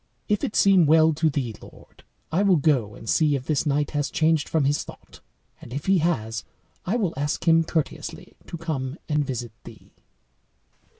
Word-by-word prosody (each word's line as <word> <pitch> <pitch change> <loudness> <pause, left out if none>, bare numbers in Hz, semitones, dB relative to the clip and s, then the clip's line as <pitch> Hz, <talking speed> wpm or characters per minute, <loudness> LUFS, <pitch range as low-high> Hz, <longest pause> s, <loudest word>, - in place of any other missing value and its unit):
If 210 -2 0
it - - -2
seem 190 -5 +5
well 160 +1 +5
to 155 +1 +1
thee, 135 -6 -3
lord, - - -16 0.3
I 170 +5 +2
will 200 -3 +4
go 135 -9 +1
and 115 - -12
see 150 +1 +2
if 130 -2 -4
this 150 0 0
knight 145 0 0
has 145 -2 -1
changed 160 -2 +1
from 155 -4 +1
his 145 +2 +1
thought, - - -14 0.4
and - - -12
if 140 +3 -5
he 195 -1 +3
has, 115 -9 -1 0.4
I 200 - +1
will 195 -8 0
ask 145 +5 -3
him 165 0 +5
courteously 160 -1 -4
to 170 - -6
come 150 -4 -4
and 150 -1 +1
visit 120 -4 -5
thee." - - -14
150 Hz, 185 wpm, -24 LUFS, 140-165 Hz, 0.4 s, seem